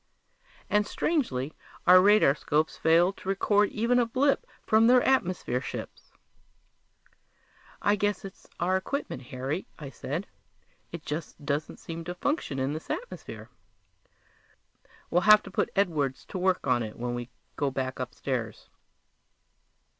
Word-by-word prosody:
And 210 Hz, 0 st, +2 dB
strangely, 155 Hz, -, -1 dB, 0.3 s
our 185 Hz, 0 st, +9 dB
radarscopes 160 Hz, -6 st, +3 dB
failed 170 Hz, +4 st, +3 dB
to 190 Hz, -, -7 dB
record 205 Hz, +1 st, +3 dB
even 235 Hz, +3 st, +1 dB
a 240 Hz, -, +3 dB
blip 270 Hz, +4 st, +1 dB, 0.2 s
from 220 Hz, +1 st, +5 dB
their 250 Hz, 0 st, +6 dB
atmosphere 185 Hz, -, +1 dB
ships! -, -, -8 dB, 1.7 s
"I 205 Hz, -, +4 dB
guess 205 Hz, 0 st, -1 dB
it's 195 Hz, -, -11 dB
our 180 Hz, +2 st, +1 dB
equipment, 190 Hz, -, -3 dB
Harry," 135 Hz, +8 st, -4 dB
I 140 Hz, -3 st, -8 dB
said. 155 Hz, +8 st, -4 dB, 0.7 s
"It 170 Hz, -3 st, -8 dB
just 150 Hz, -1 st, -6 dB
doesn't 145 Hz, +2 st, -2 dB
seem 165 Hz, 0 st, -7 dB
to 175 Hz, +1 st, -5 dB
function 285 Hz, -, -2 dB
in 135 Hz, +2 st, -1 dB
this 155 Hz, -, -7 dB
atmosphere. -, -, -6 dB, 1.6 s
We'll 175 Hz, -, +3 dB
have 215 Hz, 0 st, +9 dB
to -, -, -10 dB
put -, -, 0 dB
Edwards 155 Hz, -9 st, 0 dB
to 185 Hz, -, -4 dB
work 185 Hz, 0 st, +1 dB
on 125 Hz, -1 st, +2 dB
it 110 Hz, -2 st, -6 dB
when 120 Hz, +1 st, -3 dB
we 120 Hz, 0 st, -5 dB, 0.3 s
go 140 Hz, -1 st, 0 dB
back 130 Hz, -1 st, -3 dB
upstairs." 125 Hz, -3 st, -4 dB
170 Hz, 135 wpm, -28 LUFS, 135-205 Hz, 1.7 s, our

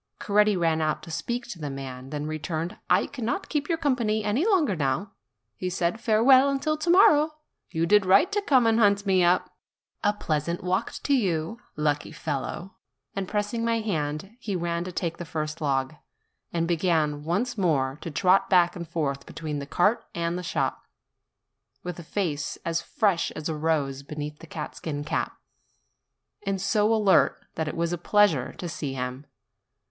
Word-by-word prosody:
Coretti 210 Hz, -1 st, +3 dB
ran 165 Hz, -2 st, +1 dB
out 155 Hz, -1 st, -1 dB
to 165 Hz, -, -9 dB
speak 240 Hz, +8 st, -3 dB
to 180 Hz, -, -7 dB
the 150 Hz, -2 st, -4 dB
man, 135 Hz, -1 st, -7 dB
then 150 Hz, 0 st, -4 dB
re 155 Hz, 0 st, -3 dB
turned: 160 Hz, +2 st, -3 dB
"I 180 Hz, +2 st, +4 dB
cannot 265 Hz, -, -3 dB
keep 295 Hz, 0 st, -1 dB
your 330 Hz, -, +1 dB
company 235 Hz, -8 st, +1 dB
any 210 Hz, +9 st, +1 dB
longer 325 Hz, -, +3 dB
now," 145 Hz, +6 st, -1 dB, 0.4 s
he 185 Hz, -, -3 dB
said; 180 Hz, +3 st, -1 dB
"farewell 255 Hz, +5 st, +5 dB
until 275 Hz, +3 st, 0 dB
to 310 Hz, +3 st, -3 dB
morrow. 310 Hz, -4 st, +6 dB, 0.3 s
You 165 Hz, +1 st, 0 dB
did 205 Hz, +3 st, +5 dB
right 250 Hz, -, +5 dB
to 415 Hz, 0 st, +1 dB
come 260 Hz, -10 st, +4 dB
and 225 Hz, 0 st, +3 dB
hunt 200 Hz, -1 st, +3 dB
me 190 Hz, -2 st, +3 dB
up. 175 Hz, +1 st, +2 dB, 0.5 s
A 205 Hz, -, +4 dB
pleasant 170 Hz, -3 st, -2 dB
walk 185 Hz, +4 st, 0 dB
to 285 Hz, -, +2 dB
you! 190 Hz, -, 0 dB, 0.2 s
lucky 150 Hz, -1 st, 0 dB
fellow!" 160 Hz, +5 st, -4 dB, 0.4 s
And 195 Hz, -1 st, -2 dB
pressing 210 Hz, +3 st, -1 dB
my 230 Hz, 0 st, +1 dB
hand, 165 Hz, 0 st, -3 dB
he 205 Hz, -5 st, -3 dB
ran 170 Hz, -1 st, -1 dB
to 185 Hz, -, -5 dB
take 170 Hz, -1 st, -3 dB
the -, -, -5 dB
first 155 Hz, -1 st, -4 dB
log, 135 Hz, -1 st, 0 dB, 0.6 s
and 165 Hz, -1 st, 0 dB
began 160 Hz, -4 st, +1 dB
once 200 Hz, +10 st, -1 dB
more 145 Hz, -8 st, +1 dB
to -, -, -5 dB
trot 185 Hz, +5 st, +3 dB
back 175 Hz, -2 st, +4 dB
and 170 Hz, -2 st, -6 dB
forth 145 Hz, -5 st, -2 dB
between 150 Hz, -2 st, -4 dB
the 140 Hz, -, -6 dB
cart 205 Hz, +10 st, +2 dB
and 170 Hz, 0 st, -1 dB
the 180 Hz, -, -3 dB
shop, 175 Hz, -, -2 dB, 1.0 s
with 180 Hz, -1 st, -5 dB
a -, -, -8 dB
face 160 Hz, -4 st, -2 dB
as 165 Hz, 0 st, 0 dB
fresh 195 Hz, -6 st, +1 dB
as 155 Hz, -, -4 dB
a 160 Hz, -, -2 dB
rose 150 Hz, -3 st, 0 dB
beneath 150 Hz, +1 st, -6 dB
his -, -, -12 dB
catskin 150 Hz, -4 st, -5 dB
cap, 150 Hz, -, -2 dB, 1.1 s
and 195 Hz, -1 st, -1 dB
so 210 Hz, +3 st, +2 dB
alert 210 Hz, -4 st, +3 dB
that 160 Hz, -, -2 dB
it 155 Hz, -, -4 dB
was 170 Hz, +1 st, 0 dB
a 175 Hz, -, -3 dB
pleasure 185 Hz, -8 st, +3 dB
to 175 Hz, -, -6 dB
see 145 Hz, -4 st, -4 dB
him. 125 Hz, +2 st, -5 dB
175 Hz, 180 wpm, -26 LUFS, 155-210 Hz, 1.1 s, morrow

